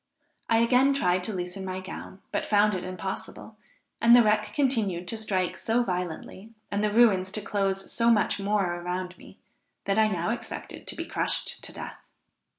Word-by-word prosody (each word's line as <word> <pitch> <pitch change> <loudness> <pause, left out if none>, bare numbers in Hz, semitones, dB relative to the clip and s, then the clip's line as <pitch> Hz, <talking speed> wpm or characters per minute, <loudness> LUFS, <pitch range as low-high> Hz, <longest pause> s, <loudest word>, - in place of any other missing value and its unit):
I 225 0 +4
again 260 +3 +4
tried 180 -9 +1
to 220 - -2
loosen 180 0 -4
my 185 0 -4
gown, 190 0 -9
but - - -1
found 210 0 +4
it 185 -1 -3
impossible, 190 +4 -6 0.5
and 235 +1 +8
the 245 - +7
wreck 210 0 +2
continued 210 -10 0
to - - -1
strike 190 -5 -1
so 235 +2 +1
violently, 180 +1 -5 0.2
and 205 +1 0
the 210 - +1
ruins 205 -5 +4
to 215 - -1
close 195 -2 -1
so 235 0 +2
much 210 -3 +2
more 195 -3 0
around 180 +1 -4
me, - - -15 0.5
that 200 +2 +1
I 220 - +5
now 185 0 -1
expected 235 0 -6
to - - -1
be - - -4
crushed - - -1
to - - -5
death. - - -8
200 Hz, 180 wpm, -27 LUFS, 185-225 Hz, 0.5 s, and